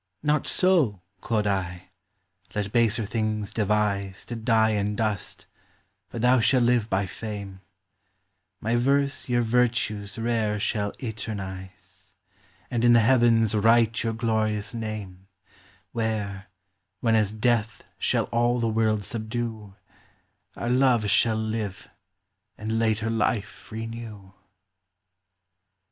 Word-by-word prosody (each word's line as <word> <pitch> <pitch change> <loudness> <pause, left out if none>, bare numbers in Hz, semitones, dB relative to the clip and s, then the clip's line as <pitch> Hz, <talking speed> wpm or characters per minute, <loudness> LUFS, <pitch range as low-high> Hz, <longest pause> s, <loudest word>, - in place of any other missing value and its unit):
Not 150 0 +1
so, 150 - +3 0.2
quod 110 -2 0
I; 90 -3 -2 0.6
let 105 -1 -2
baser 115 -1 +2
things 110 -1 -2
devize 100 -2 0
To 120 - -6
dy 110 -1 +2
in 105 0 -1
dust, 105 -4 -3 0.6
but 115 - -5
thou 125 +1 +5
shall 125 +3 +3
live 120 -2 +2
by 95 +1 +1
fame: 100 -1 -7 1.0
My 115 +2 0
verse 140 +2 +1
your 120 -1 +2
vertues 115 -3 0
rare 115 -2 0
shall 105 -1 -1
eternize, 95 -4 -7 0.6
And 120 -2 0
in 120 0 +6
the 120 - +7
heavens 115 -2 +4
wryte 115 +1 +3
your 115 -1 -1
glorious 110 -2 -1
name, 105 -5 -6 0.6
Where, 105 -4 -3 0.5
when 115 -2 +2
as 105 -2 +2
death 110 -1 0 0.2
shall - - +1
all 120 +1 +2
the 115 - +1
world 110 -1 +1
subdew, 110 -2 -5 0.8
Our 120 - -3
love 125 -5 +3
shall 110 -2 +3
live, 110 -3 -4 0.7
and 110 +1 -2
later 110 0 +1
life 110 -2 -2
renew. 110 -3 -7
110 Hz, 115 wpm, -26 LUFS, 105-115 Hz, 1.0 s, the